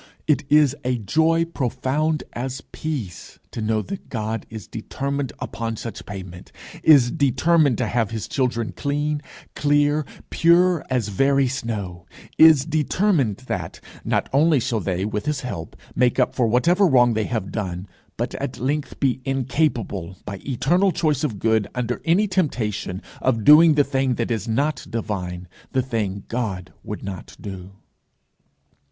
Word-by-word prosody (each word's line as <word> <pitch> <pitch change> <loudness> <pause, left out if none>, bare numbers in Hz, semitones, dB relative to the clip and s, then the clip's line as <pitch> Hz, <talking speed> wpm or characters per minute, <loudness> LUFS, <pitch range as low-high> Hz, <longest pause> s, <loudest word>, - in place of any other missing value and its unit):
It 150 -3 +2
is 150 -2 +5
a 125 -1 0
joy 160 - +2
profound 150 +1 -1
as 130 +2 -4
peace 120 - -5
to 115 - -5
know 110 0 0
that 195 0 -8
God 110 -2 -3
is 110 -3 -8
determined 140 +3 -4
upon 115 -1 -4
such 115 - -7
payment, 95 -3 -8 0.3
is 135 -6 +6
determined 145 0 +3
to 125 - 0
have 115 -1 0
his 110 -2 -4
children 120 -4 -1
clean, 145 +1 -2 0.3
clear, 145 +1 +2 0.3
pure 175 0 +4
as 125 -5 0
very 135 +6 +3
snow; 100 -8 -4 0.3
is 155 -4 +7
determined 150 - +1
that - - -4 0.2
not - - 0
only 150 +1 +4
shall 120 -2 -1
they 95 -1 -2
with 105 +2 -3
his 150 -2 -1
help 85 -11 -6 0.2
make 125 -1 +2
up - - +2
for 120 -3 +1
whatever 170 - +3
wrong 125 -5 +5
they 110 -1 0
have 110 -5 -3
done, 95 -3 -4 0.3
but - - -2
at - - -4
length 145 +4 -2
be 130 -2 +1
incapable, 130 - -1
by 100 -2 -5
eternal 175 +9 +2
choice 155 -4 0
of 120 -9 -1
good, 110 0 +1
under 125 -1 -2
any 180 +6 +3
temptation, 115 - -1 0.2
of 115 -4 +1
doing 155 +4 +8
the 145 - +5
thing 135 -2 0
that 115 +1 -2
is 115 0 -2
not 140 +5 0
divine, 90 -6 -4 0.3
the 130 - +2
thing 105 -6 -2
God 100 -7 -3
would 105 - -6
not 95 -3 -7
do. 95 -1 -8
125 Hz, 150 wpm, -22 LUFS, 110-150 Hz, 0.3 s, doing